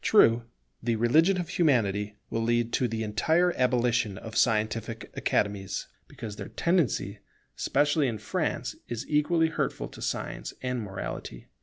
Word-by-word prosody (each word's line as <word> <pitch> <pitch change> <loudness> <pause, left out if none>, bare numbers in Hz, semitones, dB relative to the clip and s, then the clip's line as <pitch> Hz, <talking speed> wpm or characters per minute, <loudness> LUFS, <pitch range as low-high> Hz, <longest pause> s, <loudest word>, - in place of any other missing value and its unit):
True, 115 - +5 0.4
the 115 0 0
religion 160 - +4
of 175 - -2
Humanity 105 - +1 0.2
will 115 - 0
lead 120 0 +1
to 125 - +2
the 110 -1 -2
entire 160 +12 +2
abolition 120 -5 +2
of 110 +2 -8
scientific 110 0 0
Academies, 100 -2 -1 0.2
because 105 -2 -8
their - - -6
tendency, 130 - 0 0.4
especially 145 0 +2
in 115 -3 -2
France, - - -2
is 120 -1 -4
equally 160 +2 +3
hurtful 160 - -2
to - - -12
science - - -3
and 125 -1 -1
morality. 60 - -6
115 Hz, 140 wpm, -28 LUFS, 105-145 Hz, 0.4 s, True